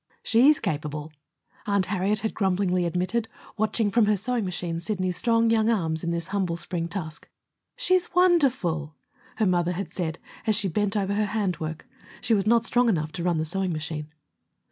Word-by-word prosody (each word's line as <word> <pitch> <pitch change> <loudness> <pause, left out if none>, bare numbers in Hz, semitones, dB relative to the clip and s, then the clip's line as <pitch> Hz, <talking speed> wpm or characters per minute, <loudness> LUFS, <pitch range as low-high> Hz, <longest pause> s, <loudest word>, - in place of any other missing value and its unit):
"She's 270 +6 +5
capable," 150 -4 -4 0.5
Aunt 200 -2 +2
Harriet 200 +2 0
had 220 - -2
grumblingly 185 -3 +1
admitted, 185 +7 -1 0.3
watching 220 -1 0
from 225 0 +3
her 210 -1 +3
sewing 230 +2 -1
machine 175 -2 -3
Sidney's 185 0 -2
strong 230 +2 +2
young 225 0 +3
arms 165 -8 +1
at 170 - -1
this 170 +1 -3
humble 190 -4 -1
spring 170 -1 -3
task. 165 -4 -7 0.5
"She's 370 -9 +1
wonderful!" 255 - +2 0.4
her 220 - +1
mother 180 -1 +1
had 195 +3 -5
said, 165 -3 -3 0.3
as 215 - +4
she 200 -1 +2
bent 205 +4 0
over 200 0 0
her 210 +1 +1
hand 195 -5 -1
work. 160 -1 -5 0.3
She 230 - +1
was 200 -1 +1
not 230 0 +4
strong 245 -1 +3
enough 155 -6 0
to 170 - -5
run 175 -2 +1
the 155 - -1
sewing 185 +2 -1
machine. 155 -1 -5
190 Hz, 180 wpm, -26 LUFS, 170-220 Hz, 0.5 s, She's